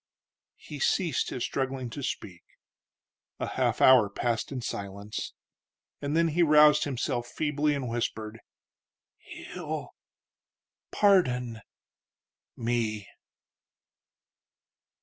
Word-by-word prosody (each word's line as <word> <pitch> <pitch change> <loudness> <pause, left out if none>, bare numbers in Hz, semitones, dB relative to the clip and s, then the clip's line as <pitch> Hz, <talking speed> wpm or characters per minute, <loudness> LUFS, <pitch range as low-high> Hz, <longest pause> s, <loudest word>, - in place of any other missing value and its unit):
He 150 - -9
ceased 170 +4 +1
his 125 - -4
struggling 130 -2 -3
to 140 - -6
speak. 90 -8 -5 1.0
A - - -1
half - - 0
hour 125 -6 +7
passed 115 +5 -2
in 135 - -3
silence, 100 -1 -5 0.7
and 145 +2 -1
then 165 0 +3
he 165 +3 +1
roused 150 -2 +6
himself 125 -3 -2
feebly 150 +1 0
and 135 -3 -3
whispered: 115 -2 -3 0.8
"He'll... - - -7 1.0
pardon... 125 - +2 1.0
me." 115 -3 -2
125 Hz, 90 wpm, -28 LUFS, 115-150 Hz, 1.0 s, hour